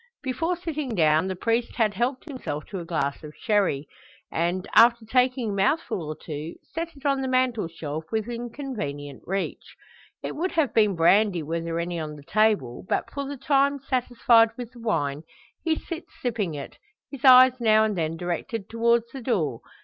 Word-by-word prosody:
Before 325 +7 -1
sitting 305 -8 -4
down 160 0 +3
the 190 - -3
priest 230 +5 -1
had 220 -4 +2
helped 245 +6 -1
himself 255 - -5
to 195 - -3
a 170 - -7
glass 150 -3 -2
of 150 0 -10
sherry; 195 -10 +1 0.4
and, 175 +3 -1
after 235 0 +6
taking 250 -1 +1
a - - -3
mouthful 200 - 0
or 155 0 -5
two, 155 +1 -6 0.2
set 330 -1 -4
it 275 - -16
on 275 -1 +2
the 265 - -2
mantelshelf, 170 - -1
within 235 +2 -3
convenient 145 - -6
reach. 195 +1 -4 0.5
It - - -4
would 360 +5 -2
have 315 -5 +1
been 210 -4 +3
brandy 180 +1 +4
were 165 +2 -2
there 165 0 -3
any 170 0 -3
on 155 -1 -5
the 145 - -13
table; 205 - +1
but, - - -1
for 280 -1 -4
the 285 0 -5
time 280 +1 +2
satisfied 245 -3 +3
with 245 -2 -6
the 245 - -14
wine, 145 -11 -1 0.4
he 325 -2 +2
sits 335 +1 -7
sipping 215 -10 -2
it, 140 - -8 0.3
his 275 -3 -9
eyes 255 -1 +9
now 220 -2 +5
and 215 -2 0
then 165 -1 -2
directed 180 +5 -4
towards 235 0 +2
the 270 - -6
door. 165 - -1
220 Hz, 180 wpm, -25 LUFS, 165-255 Hz, 0.5 s, eyes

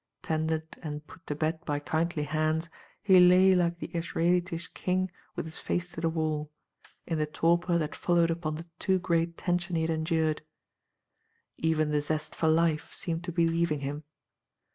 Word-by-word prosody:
Tended 160 0 -1 0.2
and 150 -2 -5
put 165 - -16
to 150 - -2
bed 160 +2 -1
by 145 -1 -1
kindly 160 +1 -1
hands, 155 +2 0 0.3
he 190 -3 +7
lay 180 +1 +7
like 175 -1 +2
the 170 - -7
Israelitish 170 +1 0
king 185 0 0 0.2
with - - -3
his 160 0 -7
face 180 0 -2
to 165 - -7
the 165 - +2
wall, 155 -2 -1 0.6
in 165 -3 -1
the 150 - +1
torpor 170 +3 +2
that 155 -3 -2
followed 170 -1 +2
upon 165 -2 -2
the 165 +2 -7
too 190 -1 +2
great 170 -2 0
tension 175 0 -1
he 160 - +1
had 165 - 0
endured. 160 -1 0 1.2
Even 155 -1 +1
the 150 -1 +2
zest 155 +1 -2
for 160 - 0
life 160 -1 +2
seemed 165 -1 -3
to - - -3
be 170 -1 +2
leaving 165 -3 0
him. 145 +2 -4
165 Hz, 175 wpm, -29 LUFS, 155-175 Hz, 1.2 s, he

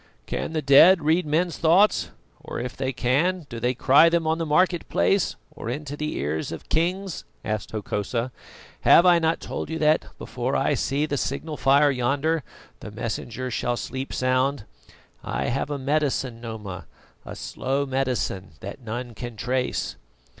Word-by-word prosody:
"Can 160 - -4
the 155 -1 -1
dead 160 +5 +7
read 160 +2 +2
men's 165 +3 0
thoughts, 175 +6 +4 0.3
or - - -5
if 125 0 -5
they 130 0 -2
can, 150 +8 +1
do 120 -3 -6
they 125 +2 0
cry 140 +7 +6
them 165 -1 +1
on 160 +1 +1
the 165 - -2
market 175 +3 +2
place 195 -2 +2 0.2
or - - -7
into 145 +3 -4
the 150 +1 -3
ears 75 +2 -2
of 80 - -8
kings?" 180 +3 -1 0.2
asked 110 -2 -2
Hokosa. 110 +3 -3 0.5
"Have 170 - +6
I 175 -1 +6
not 165 0 +1
told - - -5
you 160 - -3
that, 155 0 +2
before - - -3
I - - +2
see 140 +2 0
the 145 -2 -2
signal 150 +4 -3
fire 140 +1 +4
yonder, 140 +5 0 0.4
the - - -8
Messenger 120 +3 -4
shall 120 +1 -1
sleep 130 +2 -5
sound? 130 -1 0 0.6
I - - -2
have 135 +3 -1
a 145 - -2
medicine, 135 -4 -1
Noma, 105 -7 -7 0.4
a - - -8
slow 135 +2 -2
medicine 130 - -2
that 100 +7 -8
none 120 +1 -5
can 120 +1 -7
trace." 125 +3 -2
135 Hz, 165 wpm, -24 LUFS, 120-160 Hz, 0.6 s, dead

